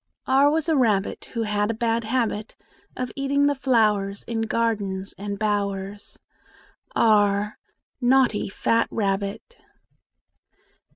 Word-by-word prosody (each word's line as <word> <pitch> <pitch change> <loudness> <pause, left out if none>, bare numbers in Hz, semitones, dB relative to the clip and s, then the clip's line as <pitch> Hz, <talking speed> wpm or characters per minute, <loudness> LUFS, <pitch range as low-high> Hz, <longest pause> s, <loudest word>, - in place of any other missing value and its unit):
R 270 +2 +4
was 315 +1 0
a 320 - +2
rabbit, 215 -7 +1
Who 230 - 0
had 210 -1 0
a 230 - -1
bad 230 0 0
habit 225 -2 -1 0.4
Of 255 -1 -3
eating 280 +1 +1
the 285 - +3
flowers 215 -7 +1
In 230 -1 -3
gardens 210 -4 -1
and 200 0 -5
bowers. 200 -1 -3 0.8
r 205 -1 +3 0.5
Naughty 245 -5 +3
fat 230 +3 +1
rabbit! 200 - -3
220 Hz, 115 wpm, -24 LUFS, 205-250 Hz, 0.8 s, R